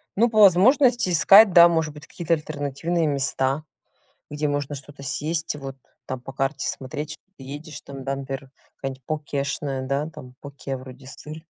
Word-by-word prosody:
ну, 235 +4 +3
по 215 -1 +1
возможности, 240 +4 +5
искать, 195 +5 +7
да, 170 0 +9
может 160 -3 0
быть 150 0 -12
какие-то 170 -1 -2
альтернативные 155 +2 -2
места, 135 0 0 0.7
где 150 0 -2
можно 145 0 -2
что-то 140 0 -11
съесть, 155 +4 -2
вот 135 -2 -8 0.3
там 130 - -5
по 135 - -9
карте 135 +1 -1
смотреть 145 +3 -5
что - - -16
ты 135 - -12
едешь 145 +2 -8
там, 135 -1 -9
да, 135 +1 -2
например, 135 -1 -6 0.3
какая-нибудь 135 -1 -6
покешная, 140 -3 -3
да, 140 +3 -1
там 130 -4 -12
поке, 140 -1 -6
вроде 130 +1 -12
сыр 155 +3 -9
145 Hz, 165 wpm, -24 LUFS, 135-160 Hz, 0.7 s, да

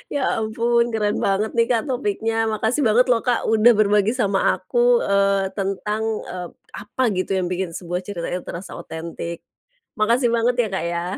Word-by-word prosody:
Ya, 285 - 0 0.2
ampun, 235 +2 +1
keren 210 -2 0
banget, 200 +2 0
nih, 230 0 +4
Kak, 230 -2 +2
topiknya. 225 -3 -1 0.2
Makasih 220 +6 0
banget, 230 +3 +4
loh, 235 -2 +3
Kak, 245 -2 +1
udah 220 +2 +5
berbagi 210 0 +3
sama 200 -6 +1 0.2
aku, 485 0 +2
eee, 195 -1 +2
tentang 210 +2 -2 0.2
e - - -7 0.4
apa, 235 +5 -3
gitu, 185 +1 -2
yang 180 - -1
bikin 180 0 -3
sebuah 175 +1 -4
cerita 180 -3 -5
itu 180 0 -3
terasa 175 +3 -8
otentik. 170 +1 -6 0.6
Makasih 235 +3 +3
banget, 235 +1 +2
ya, 220 - -2
Kak, 190 - -2
ya. 170 0 -2
210 Hz, 170 wpm, -22 LUFS, 190-235 Hz, 0.6 s, udah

